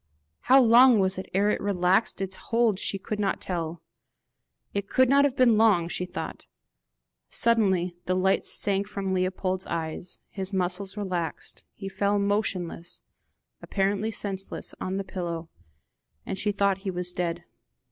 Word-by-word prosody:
How 265 Hz, +2 st, +5 dB
long 245 Hz, +1 st, +7 dB
it -, -, +3 dB
was 190 Hz, 0 st, 0 dB
ere 200 Hz, +2 st, +2 dB
it -, -, -2 dB
relaxed 195 Hz, +1 st, +1 dB
its 190 Hz, 0 st, -2 dB
hold 230 Hz, -4 st, +1 dB
she 195 Hz, -, -1 dB
could 210 Hz, +2 st, -5 dB
not 200 Hz, -2 st, 0 dB
tell; 170 Hz, -2 st, -4 dB, 0.9 s
it 200 Hz, -1 st, -3 dB
could 260 Hz, -1 st, +4 dB
not 280 Hz, +1 st, +5 dB
have 275 Hz, -2 st, 0 dB
been 235 Hz, -5 st, +4 dB
long, 205 Hz, -7 st, +4 dB
she 180 Hz, -, -3 dB
thought. 180 Hz, -, -7 dB, 0.8 s
Suddenly 190 Hz, -7 st, +2 dB
the 185 Hz, -, 0 dB
light 190 Hz, +1 st, +2 dB
sank 200 Hz, -1 st, 0 dB
from 195 Hz, -2 st, -3 dB
Leopold's 185 Hz, 0 st, -1 dB
eyes, 165 Hz, +1 st, -4 dB
his 195 Hz, 0 st, -6 dB
muscles 190 Hz, +2 st, -1 dB
relaxed, 180 Hz, -6 st, -4 dB
he 195 Hz, -, -7 dB
fell 200 Hz, +1 st, 0 dB
back -, -, +1 dB
motionless, 185 Hz, -5 st, -2 dB, 0.6 s
apparently 200 Hz, +2 st, 0 dB
senseless, 195 Hz, -3 st, -4 dB
on 190 Hz, +1 st, -2 dB
the 195 Hz, -, -2 dB
pillow, 170 Hz, -4 st, -5 dB, 0.7 s
and 190 Hz, -, -4 dB
she 210 Hz, -, +1 dB
thought 200 Hz, -1 st, +1 dB
he 195 Hz, 0 st, -4 dB
was 180 Hz, -1 st, -2 dB
dead. 175 Hz, -1 st, -2 dB
195 Hz, 155 wpm, -27 LUFS, 180-205 Hz, 0.9 s, long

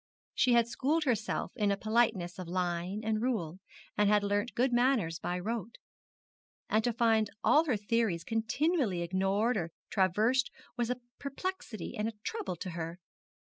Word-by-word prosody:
She 250 Hz, -, +3 dB
had 235 Hz, -1 st, +5 dB
schooled 295 Hz, +7 st, 0 dB
herself 230 Hz, -6 st, -1 dB
in 210 Hz, -2 st, +1 dB
a 200 Hz, -, +1 dB
politeness 215 Hz, -5 st, +1 dB
of 180 Hz, -, -5 dB
line 180 Hz, +2 st, -2 dB
and 220 Hz, 0 st, 0 dB
rule, 190 Hz, -9 st, -1 dB, 0.4 s
had 210 Hz, 0 st, +4 dB
learnt 205 Hz, +3 st, 0 dB
good 250 Hz, +1 st, +2 dB
manners 240 Hz, -10 st, +2 dB
by 180 Hz, -, -2 dB
rote; 225 Hz, +4 st, -3 dB, 1.0 s
and 215 Hz, +1 st, +3 dB
to 240 Hz, -, +2 dB
find 225 Hz, -2 st, +2 dB
all 310 Hz, +2 st, +5 dB
her 255 Hz, -8 st, +1 dB
theories 205 Hz, -5 st, 0 dB
continually 225 Hz, -, 0 dB
ignored 195 Hz, +6 st, +1 dB
or 170 Hz, -3 st, -2 dB, 0.2 s
traversed 215 Hz, +7 st, +2 dB, 0.3 s
was 240 Hz, -1 st, -1 dB
a 250 Hz, 0 st, -2 dB, 0.2 s
perplexity 280 Hz, -, -5 dB
and 210 Hz, +1 st, -1 dB
a 225 Hz, -, -3 dB
trouble 440 Hz, -, -3 dB
to 180 Hz, +2 st, -6 dB
her. 165 Hz, 0 st, -5 dB
220 Hz, 155 wpm, -31 LUFS, 185-245 Hz, 1.0 s, had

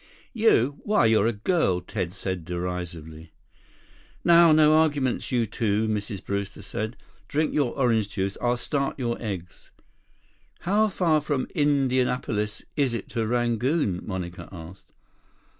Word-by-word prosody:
"You! 150 Hz, -, +3 dB
Why, 210 Hz, -, +2 dB
you're 110 Hz, -1 st, +4 dB
a -, -, +2 dB
girl," 105 Hz, -, +1 dB
Ted 90 Hz, -1 st, -4 dB
said 95 Hz, -2 st, -4 dB
derisively. 85 Hz, -2 st, -6 dB, 0.9 s
"Now, 170 Hz, -1 st, +7 dB
no 155 Hz, 0 st, +6 dB
arguments, 145 Hz, -5 st, +1 dB
you 120 Hz, -2 st, +2 dB
two," 110 Hz, 0 st, 0 dB
Mrs. 105 Hz, -2 st, -3 dB
Brewster 100 Hz, 0 st, -4 dB
said. 110 Hz, +4 st, -4 dB, 0.3 s
"Drink 155 Hz, +2 st, 0 dB
your 140 Hz, -5 st, 0 dB
orange 115 Hz, -6 st, +2 dB
juice. 100 Hz, -1 st, -2 dB
I'll 120 Hz, 0 st, +1 dB
start 140 Hz, +2 st, -2 dB
your 120 Hz, -3 st, -2 dB
eggs." 95 Hz, -6 st, -6 dB, 0.9 s
"How 205 Hz, +5 st, +2 dB
far 170 Hz, -6 st, +1 dB
from 145 Hz, -3 st, -1 dB
Indianapolis 125 Hz, -7 st, 0 dB
is 135 Hz, -5 st, +1 dB
it -, -, -6 dB
to 115 Hz, -3 st, -2 dB
Rangoon?" 120 Hz, -, 0 dB
Monica 90 Hz, -3 st, -6 dB
asked. 90 Hz, +1 st, -11 dB
115 Hz, 130 wpm, -25 LUFS, 95-145 Hz, 0.9 s, Now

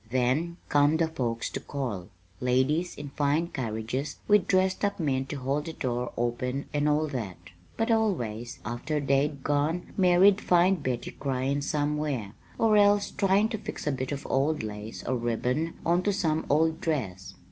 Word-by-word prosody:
"Then 130 Hz, +8 st, 0 dB
come 145 Hz, +2 st, +4 dB
the 165 Hz, 0 st, +2 dB
folks 120 Hz, -6 st, -2 dB
to -, -, -3 dB
call, 120 Hz, -11 st, -4 dB, 0.3 s
ladies 130 Hz, +8 st, +1 dB
in 145 Hz, -1 st, -7 dB
fine 150 Hz, +4 st, 0 dB
carriages 115 Hz, +2 st, -3 dB
with 210 Hz, -3 st, +4 dB
dressed 185 Hz, +1 st, +2 dB
up 200 Hz, -1 st, 0 dB
men 135 Hz, -4 st, 0 dB
to -, -, -5 dB
hold 140 Hz, +2 st, -1 dB
the 165 Hz, -, -5 dB
door 125 Hz, -3 st, -2 dB
open 125 Hz, +3 st, -1 dB
and 145 Hz, 0 st, +2 dB
all 150 Hz, +1 st, +2 dB
that; 110 Hz, -9 st, -4 dB, 0.4 s
but 225 Hz, +1 st, +1 dB
always, 120 Hz, -, 0 dB
after 120 Hz, +7 st, -2 dB
they'd 140 Hz, 0 st, +1 dB
gone, 150 Hz, +4 st, 0 dB
Mary'd 190 Hz, +2 st, +5 dB
find 180 Hz, 0 st, +3 dB
Betty 125 Hz, -3 st, -2 dB
cryin' 135 Hz, +1 st, -1 dB
somewhere, 145 Hz, -7 st, -1 dB, 0.2 s
or 220 Hz, -2 st, +4 dB
else 205 Hz, 0 st, +4 dB
tryin' 200 Hz, +2 st, +2 dB
to 220 Hz, -, -3 dB
fix 210 Hz, -, -6 dB
a 150 Hz, -, +1 dB
bit 130 Hz, 0 st, -3 dB
of 140 Hz, -1 st, -4 dB
old 140 Hz, +1 st, +1 dB
lace 105 Hz, +1 st, -6 dB
or 130 Hz, -, -1 dB
ribbon 125 Hz, +7 st, -1 dB
on 175 Hz, +2 st, +3 dB
to 205 Hz, +2 st, +1 dB
some 160 Hz, -5 st, 0 dB
old 160 Hz, +2 st, +2 dB
dress. 105 Hz, -, -3 dB
145 Hz, 170 wpm, -28 LUFS, 125-170 Hz, 0.4 s, Mary'd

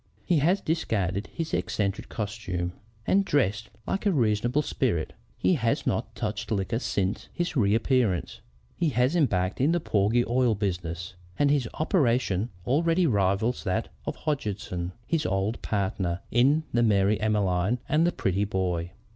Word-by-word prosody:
He 175 Hz, -4 st, +3 dB
has 180 Hz, +7 st, +2 dB
discarded 105 Hz, -, -1 dB
his 165 Hz, -1 st, -5 dB
eccentric 100 Hz, 0 st, -1 dB
costume, 95 Hz, -5 st, -3 dB, 0.3 s
and 200 Hz, +1 st, +3 dB
dresses 110 Hz, -, +1 dB, 0.2 s
like 200 Hz, +2 st, -1 dB
a -, -, +4 dB
reasonable 120 Hz, -, +1 dB
spirit. 85 Hz, -, -1 dB, 0.2 s
He -, -, +2 dB
has 115 Hz, -8 st, 0 dB
not -, -, -1 dB
touched 105 Hz, 0 st, -3 dB
liquor 110 Hz, +2 st, 0 dB
since 100 Hz, -5 st, -2 dB
his 175 Hz, -2 st, -2 dB
reappearance. 110 Hz, -3 st, +1 dB, 0.3 s
He 170 Hz, -, +1 dB
has 125 Hz, +4 st, +2 dB
embarked 100 Hz, -, +1 dB
in 150 Hz, +5 st, +3 dB
the 175 Hz, -, +2 dB
porgy 110 Hz, -3 st, +2 dB
oil 120 Hz, -2 st, +2 dB
business, 90 Hz, -3 st, -3 dB, 0.2 s
and 145 Hz, -1 st, +3 dB
his 135 Hz, -6 st, +1 dB
operations 120 Hz, -, +1 dB, 0.2 s
already 165 Hz, +6 st, +2 dB
rival 100 Hz, -, +2 dB
that 95 Hz, -3 st, -1 dB, 0.2 s
of -, -, -2 dB
Hodgeson, 105 Hz, -, -3 dB
his 165 Hz, -2 st, 0 dB
old 95 Hz, +4 st, -1 dB
partner 95 Hz, -3 st, -1 dB
in 140 Hz, +7 st, +4 dB
the 120 Hz, -, +3 dB
Mary 105 Hz, -1 st, +3 dB
Emmeline 105 Hz, 0 st, +1 dB
and 160 Hz, +3 st, +3 dB
the -, -, +2 dB
Prettyboat. 95 Hz, -, -1 dB
110 Hz, 145 wpm, -27 LUFS, 95-140 Hz, 0.3 s, a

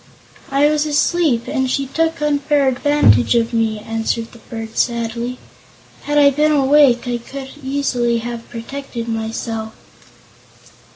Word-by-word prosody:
"I 275 Hz, +1 st, +3 dB
was 300 Hz, 0 st, +2 dB
asleep, 295 Hz, -4 st, +1 dB
and 265 Hz, -3 st, -1 dB
she 275 Hz, +2 st, 0 dB
took 325 Hz, +3 st, -1 dB
unfair 290 Hz, -1 st, +1 dB
advantage 255 Hz, -, +3 dB
of 230 Hz, 0 st, +1 dB
me," 225 Hz, -1 st, +1 dB
answered 225 Hz, +1 st, -3 dB
the 235 Hz, -, -15 dB
bird 225 Hz, 0 st, -8 dB
sadly. 235 Hz, +1 st, -1 dB, 0.7 s
"Had 295 Hz, 0 st, 0 dB
I 285 Hz, -1 st, +6 dB
been 300 Hz, +3 st, +2 dB
awake, 275 Hz, -3 st, +4 dB
I 240 Hz, -1 st, -1 dB
could 265 Hz, +3 st, -9 dB
easily 265 Hz, -4 st, 0 dB
have 235 Hz, 0 st, -6 dB
protected 235 Hz, 0 st, -6 dB
myself." 225 Hz, 0 st, -4 dB
250 Hz, 130 wpm, -18 LUFS, 230-285 Hz, 0.7 s, I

